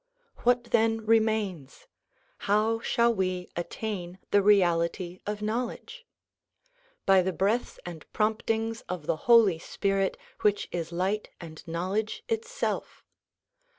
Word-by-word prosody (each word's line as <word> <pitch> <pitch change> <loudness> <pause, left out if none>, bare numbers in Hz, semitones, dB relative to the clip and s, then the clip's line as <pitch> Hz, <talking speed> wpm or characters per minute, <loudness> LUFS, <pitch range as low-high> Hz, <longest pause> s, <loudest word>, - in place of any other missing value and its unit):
What 245 0 +2
then 225 -1 +2
re 225 +1 +6
mains? 205 -10 -3 0.6
How 215 +2 +3
shall 235 +1 +2
we 185 -3 -2
attain 180 0 -4
the 205 - +5
reality 180 -2 +2
of 210 0 -3
knowledge? 245 - -4 1.0
By 195 -1 +6
the 190 +1 0
breaths 205 +7 0
and 170 -3 -9
promptings 225 +1 0
of 180 -4 -4
the - - +1
Holy 220 -8 +6
Spirit 195 +2 -1 0.2
which 205 -1 +1
is 170 -1 -3
light 190 +5 -1
and 160 -3 -9
knowledge 185 +6 -2
Itself. 465 +2 -3
205 Hz, 120 wpm, -28 LUFS, 180-225 Hz, 1.0 s, re